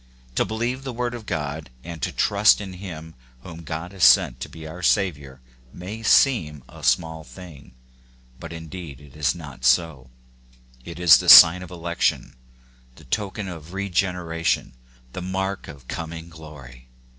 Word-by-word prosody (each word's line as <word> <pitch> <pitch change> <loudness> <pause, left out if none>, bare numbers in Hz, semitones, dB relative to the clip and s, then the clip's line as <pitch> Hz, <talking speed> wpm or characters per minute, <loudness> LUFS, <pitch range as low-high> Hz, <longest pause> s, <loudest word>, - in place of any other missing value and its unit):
To - - +1
believe 120 +4 -3
the 130 -2 -6
word 120 +1 -3
of 115 -3 -9
God, 75 -2 -4
and 85 -2 -9
to - - -2
trust 105 +1 +3
in 100 -2 -7
him 85 -4 -9 0.3
whom 85 +3 -10
God 80 +3 -6
has 95 -3 -4
sent - - +5
to - - -7
be 80 -1 -11
our 85 +3 -9
Saviour 75 -9 -1 0.3
may 100 +8 -8
seem 85 - +2
a - - -14
small 80 +5 0
thing; 80 -8 -14 0.6
but 85 -2 -9
indeed 80 -3 -9
it 75 -2 -17
is 75 +1 0
not 70 -7 -11
so: 65 0 +1 0.7
it 85 +3 -9
is 85 -4 +7
the 90 - -1
sign 90 0 +10
of 90 - -9
election, 85 -1 -2 0.6
the - - -17
token 105 -1 -3
of 85 -1 -9
regeneration, 90 -7 -1 0.4
the 90 - -6
mark 95 +1 -4
of 70 -5 -13
coming 80 0 -7
glory. 70 -6 -13
85 Hz, 155 wpm, -23 LUFS, 75-95 Hz, 0.7 s, sign